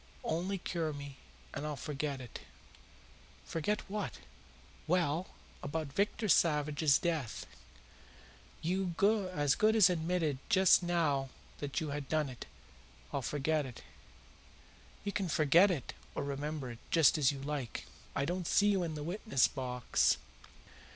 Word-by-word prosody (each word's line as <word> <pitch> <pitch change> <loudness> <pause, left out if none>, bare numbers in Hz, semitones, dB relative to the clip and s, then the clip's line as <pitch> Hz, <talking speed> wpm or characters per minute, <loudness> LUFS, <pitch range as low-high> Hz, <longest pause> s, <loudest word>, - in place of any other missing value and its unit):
Only 180 +5 -1
cure 165 -3 -2
me, 140 -1 -8 0.4
and 140 - -4
I'll 150 -1 -3
forget 145 -1 -3
it." 125 -3 -8 1.1
"Forget 205 +6 -2
what?" 205 0 -4 0.7
"Well, 170 0 +1 0.3
about 155 -1 -4
Victor 205 +4 0
Savage's 150 -4 +4
death. 160 -9 -2 1.2
You 180 +1 -1 0.4
as 145 -5 +2
good 215 +7 +3
as 195 -5 +7
admitted 165 -4 0
just 190 -1 +6
now 160 -6 +1 0.3
that 145 +1 -2
you 160 -3 -3
had 145 -1 -4
done 155 -3 +1
it. 125 - -9 0.7
I'll 140 - 0
forget 150 +4 0
it." 130 -3 -9 1.2
"You 200 - -2
can 195 0 -1
forget 160 +6 +5
it 155 -9 -3 0.2
or - - -1
remember 140 -1 -3
it, 115 - -10
just 160 -1 +5
as 140 -2 +4
you 140 - -6
like. 140 -4 -4 0.3
I 140 - +1
don't 175 +1 -2
see 205 0 +4
you 195 -2 +2
in 165 -3 -2
the 150 -1 -5
witnessbox. 130 - +1
155 Hz, 135 wpm, -33 LUFS, 140-180 Hz, 1.2 s, as